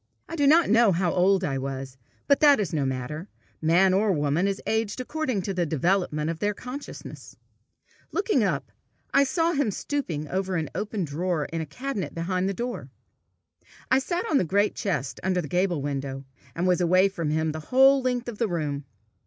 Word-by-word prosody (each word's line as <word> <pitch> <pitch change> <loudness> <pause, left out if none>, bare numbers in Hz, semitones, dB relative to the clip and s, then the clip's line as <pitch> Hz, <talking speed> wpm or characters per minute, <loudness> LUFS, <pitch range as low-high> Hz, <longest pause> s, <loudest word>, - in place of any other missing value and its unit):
I 330 - -6
do 285 -3 +2
not 320 +4 +6
know 225 -1 +5
how 175 0 +1
old 190 +1 +3
I 135 -6 -1
was, 135 -1 -5 0.3
but 280 - +4
that 290 -4 +6
is 195 -7 -2
no 145 -4 0
matter; 130 +7 -4 0.3
man 175 +4 +4
or 205 +2 +3
woman 150 +3 +1
is 195 0 -1
aged 220 0 -1
according 255 -6 -2
to 195 - -2
the 180 -2 0
development 160 0 0
of 165 - -7
the 205 +1 0
conscience. 255 +6 -9 0.8
Looking 415 +1 +1
up, - - -1 0.4
I 280 - +6
saw 330 +5 +1
him 285 -7 +1
stooping 185 - -3
over 190 +2 -2
an 160 -3 -2
open 205 -3 -2
drawer 160 +1 -1
in 165 - -1
a 160 - -5
cabinet 250 - -4
behind 180 +3 -1
the - - -1
door. 240 +3 -4 1.0
I 260 - +6
sat 345 +8 -2
on 290 - +3
the - - +2
great 200 +5 +1
chest 175 -9 -3
under 185 0 0
the 160 - -3
gable 175 -2 0
window, 135 -1 -4 0.3
and 175 - -1
was 180 -1 +2
away 185 +2 +4
from 170 -6 -3
him 160 +1 0
the 155 - -5
whole 270 +1 +6
length 250 -1 -1
of 230 -4 -6
the 230 - +2
room. 150 -6 -3
185 Hz, 195 wpm, -26 LUFS, 155-240 Hz, 1.0 s, not